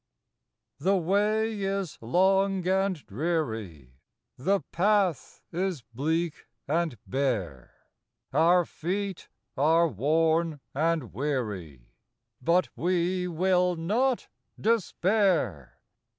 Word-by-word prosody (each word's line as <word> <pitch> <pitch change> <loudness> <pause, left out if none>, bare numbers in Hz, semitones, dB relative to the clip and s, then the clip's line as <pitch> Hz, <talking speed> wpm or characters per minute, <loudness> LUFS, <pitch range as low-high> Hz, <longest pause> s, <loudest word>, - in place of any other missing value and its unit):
HTHE 190 +4 +3
way 210 +4 +1
is 195 -3 -2
long 190 +7 +2
and 190 0 +2
dreary, 110 - -3 0.4
The 195 +9 +1
path 195 -2 +1
is 180 -5 -2
bleak 160 +5 -1 0.2
and 160 -3 0
bare; 110 - -2 0.6
Our 170 +4 +4
feet 190 +4 -4 0.3
are 160 +4 +4
worn 160 - +1
and 155 - 0
weary, 105 - -4 0.5
But 170 +7 +2
we 180 +1 0
will 180 +1 +2
not 230 +10 0 0.3
despair. 190 - +1
170 Hz, 85 wpm, -28 LUFS, 135-190 Hz, 0.6 s, Our